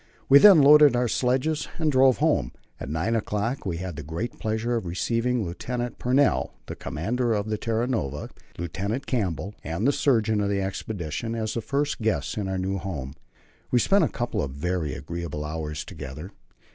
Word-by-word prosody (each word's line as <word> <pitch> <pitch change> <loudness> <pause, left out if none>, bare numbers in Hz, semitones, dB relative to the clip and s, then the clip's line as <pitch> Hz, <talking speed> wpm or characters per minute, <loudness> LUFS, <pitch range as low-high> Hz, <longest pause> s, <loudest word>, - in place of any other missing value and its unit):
We 140 +1 +8
then 190 -6 +8
loaded 150 -1 +8
our 120 0 +2
sledges 130 +6 0
and 160 -2 +1
drove 130 -1 +5
home. 145 - +1 0.3
At - - -6
nine 80 +9 0
o'clock 110 +2 -2
we 85 -3 -2
had 90 -3 -5
the - - -4
great 80 +10 -5
pleasure 110 +2 -1
of 115 -6 -2
receiving 115 +6 0
Lieutenant 120 +8 -4
Pennell, 130 +3 +2
the - - -6
commander 115 +9 -1
of 105 0 -1
the 110 - -1
Terra 115 +1 0
Nova, 75 - -3 0.3
Lieutenant 95 - -3
Campbell, 100 - -2
and 85 +7 -2
the - - +5
surgeon 110 -7 +2
of 100 - 0
the 100 -1 0
expedition, 95 +1 -4
as 110 -1 -2
the 115 - -2
first 140 +3 -1
guests 75 - 0
in 100 -2 -2
our 95 0 -2
new 95 +1 -2
home. 75 -8 -5 0.6
We 125 - +3
spent 195 +11 +4
a - - +3
couple 120 0 -2
of 70 - -2
very 80 0 -2
agreeable 75 +1 -5
hours 75 -1 -4
together. 75 +7 -8
105 Hz, 185 wpm, -25 LUFS, 85-125 Hz, 0.6 s, We